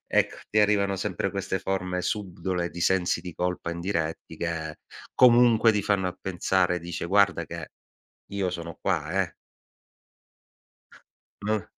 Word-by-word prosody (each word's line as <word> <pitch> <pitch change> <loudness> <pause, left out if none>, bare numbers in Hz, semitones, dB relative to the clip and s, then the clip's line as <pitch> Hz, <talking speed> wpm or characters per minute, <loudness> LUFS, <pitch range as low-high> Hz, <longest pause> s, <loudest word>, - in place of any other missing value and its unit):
Ecco, - - +3
ti 110 - +2
arrivano 100 -2 +3
sempre 100 0 -2
queste 95 -1 -2
forme 90 -1 -2
subdole, 90 -3 -2
di 85 - -7
sensi 90 0 +2
di 90 -2 -8
colpa 90 -1 -2
indiretti 85 -2 -3
che 80 -2 -3 0.4
comunque 120 -2 +6
ti 105 -1 0
fanno 95 -2 +1
a 90 - -5
pensare, 90 -1 +1
dice 85 0 -5
guarda 95 -4 +3
che 85 +1 -7 0.6
io 95 -2 0
sono 85 -2 -6
qua - - 0
eh. - - -6 2.1
Non 105 -1 0
95 Hz, 130 wpm, -27 LUFS, 85-100 Hz, 2.1 s, comunque